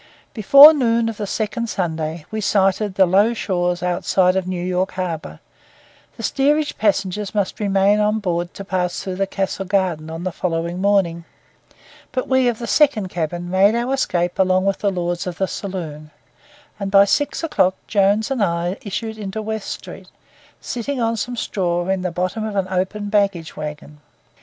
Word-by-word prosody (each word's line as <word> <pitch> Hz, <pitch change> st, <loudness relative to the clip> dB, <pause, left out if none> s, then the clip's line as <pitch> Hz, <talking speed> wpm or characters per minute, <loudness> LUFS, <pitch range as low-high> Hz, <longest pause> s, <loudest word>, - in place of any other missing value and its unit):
Before 280 Hz, +8 st, +9 dB
noon 230 Hz, -5 st, +1 dB
of 225 Hz, -, -6 dB
the 205 Hz, -, -4 dB
second 230 Hz, +3 st, -2 dB
Sunday 160 Hz, -4 st, -3 dB
we 220 Hz, 0 st, -3 dB
sighted 195 Hz, 0 st, +1 dB
the 190 Hz, -, +5 dB
low 200 Hz, +6 st, +3 dB
shores 180 Hz, -4 st, -1 dB
outside 180 Hz, +1 st, +2 dB
of 190 Hz, -1 st, -1 dB
New 180 Hz, -1 st, -3 dB
York 185 Hz, +1 st, -1 dB
harbour; 175 Hz, -4 st, -5 dB, 0.8 s
the -, -, -8 dB
steerage 295 Hz, +2 st, +1 dB
passengers 205 Hz, -1 st, 0 dB
must 200 Hz, -2 st, -1 dB
remain 200 Hz, 0 st, +2 dB
on 210 Hz, +1 st, +2 dB
board 175 Hz, -4 st, -2 dB
to 195 Hz, -, -8 dB
pass 180 Hz, -2 st, -1 dB
through 190 Hz, 0 st, -2 dB
Castle 195 Hz, 0 st, -3 dB
Garden 180 Hz, -5 st, -1 dB
on 165 Hz, +1 st, -6 dB
the 185 Hz, -, -2 dB
following 170 Hz, +1 st, -3 dB
morning; 190 Hz, -4 st, +1 dB, 0.9 s
but 255 Hz, 0 st, -2 dB
we 260 Hz, -1 st, +3 dB
of 240 Hz, -2 st, 0 dB
the 235 Hz, -, -5 dB
second 260 Hz, -8 st, +2 dB
cabin 175 Hz, 0 st, -3 dB
made 195 Hz, +4 st, +4 dB
our 240 Hz, +3 st, -1 dB
escape 175 Hz, -10 st, -1 dB
along 185 Hz, 0 st, +3 dB
with 195 Hz, -1 st, 0 dB
the 205 Hz, -, +1 dB
lords 175 Hz, 0 st, -3 dB
of 175 Hz, -, -5 dB
the 190 Hz, -, 0 dB
saloon; 160 Hz, -7 st, -6 dB, 0.7 s
and 200 Hz, -1 st, -3 dB
by 195 Hz, 0 st, +6 dB
six 290 Hz, +9 st, 0 dB
o'clock 190 Hz, -, +2 dB
Jones 205 Hz, +3 st, +2 dB
and 255 Hz, -6 st, +1 dB
I 175 Hz, +1 st, -1 dB
issued 220 Hz, 0 st, -5 dB
into 205 Hz, +1 st, -5 dB
West 220 Hz, -1 st, -4 dB
Street, -, -, -8 dB, 0.5 s
sitting 250 Hz, +2 st, -4 dB
on 230 Hz, -1 st, 0 dB
some 245 Hz, +3 st, -4 dB
straw 175 Hz, -5 st, -1 dB
in 190 Hz, -1 st, 0 dB
the 180 Hz, -, -1 dB
bottom 185 Hz, +5 st, -2 dB
of 215 Hz, -1 st, -4 dB
an 195 Hz, -2 st, 0 dB
open 190 Hz, +3 st, -2 dB
baggage 200 Hz, -6 st, 0 dB
wagon. 150 Hz, 0 st, -7 dB
195 Hz, 175 wpm, -20 LUFS, 180-215 Hz, 0.9 s, Before